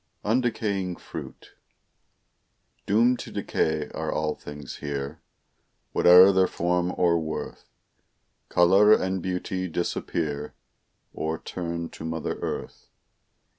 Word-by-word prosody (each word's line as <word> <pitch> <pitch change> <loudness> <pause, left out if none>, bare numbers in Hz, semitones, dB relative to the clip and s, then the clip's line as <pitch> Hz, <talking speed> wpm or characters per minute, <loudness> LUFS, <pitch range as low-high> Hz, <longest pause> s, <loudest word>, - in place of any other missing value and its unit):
UNDECAYING 105 -5 0
FRUIT - - -10 1.4
Doomed 120 +4 +3
to - - -8
decay 80 -2 -1
are - - -3
all 75 -1 -1
things 75 -1 -9
here; 70 +1 -5 0.7
Whate'er 90 +2 +8
their 95 -1 +3
form 90 +1 0
or 85 -1 +3
worth, 80 -1 -6 0.8
Color 95 +5 +6
and 95 -1 +1
beauty 95 0 -3
disappear, 80 -3 -3 0.6
Or 80 +1 -2
turn 85 -1 -5
to - - -10
mother 80 0 -3
earth. - - -5
90 Hz, 100 wpm, -26 LUFS, 80-95 Hz, 1.4 s, Whate'er